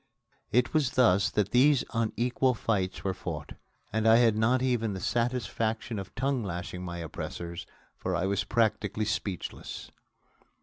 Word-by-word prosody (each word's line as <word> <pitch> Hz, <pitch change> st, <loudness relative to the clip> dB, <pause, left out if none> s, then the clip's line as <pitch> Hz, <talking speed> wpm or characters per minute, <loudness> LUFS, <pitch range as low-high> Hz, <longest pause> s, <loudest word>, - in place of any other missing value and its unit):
It 125 Hz, +2 st, +2 dB
was 145 Hz, -5 st, +2 dB
thus 105 Hz, -7 st, +4 dB
that 105 Hz, -1 st, 0 dB
these 135 Hz, +2 st, +5 dB
unequal 120 Hz, +3 st, +1 dB
fights 95 Hz, -5 st, -1 dB
were 95 Hz, -, 0 dB
fought. 80 Hz, -5 st, -6 dB, 0.4 s
And 110 Hz, 0 st, +1 dB
I 110 Hz, -, +8 dB
had 115 Hz, -2 st, +5 dB
not 120 Hz, +4 st, +2 dB
even 115 Hz, -5 st, +1 dB
the -, -, -4 dB
satisfaction 115 Hz, 0 st, -1 dB
of 95 Hz, -, -8 dB
tongue 135 Hz, -1 st, 0 dB
lashing 90 Hz, -1 st, -5 dB
my 85 Hz, -1 st, -5 dB
oppressors, 85 Hz, +1 st, -6 dB, 0.3 s
for -, -, -2 dB
I -, -, 0 dB
was 100 Hz, +1 st, 0 dB
practically 110 Hz, -2 st, 0 dB
speechless. 100 Hz, -3 st, -4 dB
110 Hz, 145 wpm, -29 LUFS, 95-120 Hz, 0.4 s, I